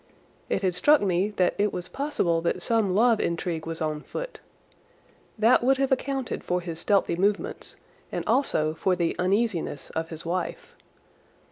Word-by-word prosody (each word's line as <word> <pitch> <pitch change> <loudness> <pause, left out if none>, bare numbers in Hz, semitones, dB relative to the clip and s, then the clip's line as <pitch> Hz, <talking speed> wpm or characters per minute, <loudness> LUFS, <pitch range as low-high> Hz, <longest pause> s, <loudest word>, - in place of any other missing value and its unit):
It - - 0
had 185 -1 +2
struck 295 - +5
me 190 0 +1
that 180 -1 +2
it 205 0 +2
was 180 0 -5
possible 265 - 0
that 170 +1 -1
some 220 -5 +1
love 230 +1 +4
intrigue 170 -1 -2
was 165 0 -4
on 155 -1 -2
foot. - - -6 1.0
That 225 +3 +4
would 265 +2 +4
have 270 0 0
accounted 265 -1 -1
for 180 0 0
his 170 -2 -6
stealthy 200 -3 +2
movements 200 +3 -1 0.4
and - - -3
also 220 - +1
for 180 +3 +1
the 170 -2 0
uneasiness 185 -5 0
of 160 0 -3
his 160 0 -8
wife. 175 +1 -3
185 Hz, 160 wpm, -26 LUFS, 170-230 Hz, 1.0 s, struck